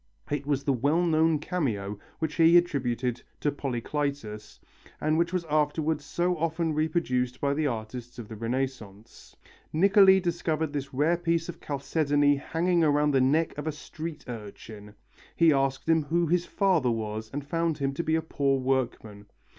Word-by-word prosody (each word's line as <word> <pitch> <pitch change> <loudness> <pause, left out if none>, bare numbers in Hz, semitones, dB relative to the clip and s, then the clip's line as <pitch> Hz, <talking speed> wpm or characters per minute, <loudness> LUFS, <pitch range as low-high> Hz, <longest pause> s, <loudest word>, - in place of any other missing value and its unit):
It 145 -1 -2
was 140 -2 0
the 140 - +1
well 145 +8 +1
known 160 -1 +3
cameo 115 - -3 0.2
which 160 -2 -2
he 165 +1 +6
attributed 125 -7 0 0.2
to 145 - 0
Polycletus 135 -5 -4 0.4
and 155 +1 +1
which 170 +1 +1
was 180 -2 -2
afterwards 150 0 0
so 180 +1 0
often 160 0 -1
reproduced 150 -6 0
by 140 0 +1
the 150 +1 0
artists 120 0 -6
of 115 -3 -7
the 110 - -8
Renaissance. 115 -2 -5 0.4
Niccoli 190 +3 +6
discovered 165 -4 -1
this 140 -1 -4
rare 150 +6 +2
piece 170 -1 -1
of 175 - -8
chalcedony 145 0 +1
hanging 170 +4 0
round 150 -1 +3
the 135 - +4
neck 155 +5 +2
of 150 - -5
a - - +1
street 155 +1 -8
urchin. 105 -2 -9 0.4
He 165 -2 +5
asked 135 0 0
him 165 -1 +4
who 170 +3 +1
his 175 +2 +1
father 185 -10 +2
was 110 -1 -3
and 145 0 -5
found 165 +1 -1
him 135 -2 -1
to 170 - -3
be 160 - +1
a 160 - 0
poor 140 -3 0
workman. 120 -6 -2
145 Hz, 165 wpm, -27 LUFS, 125-165 Hz, 0.4 s, he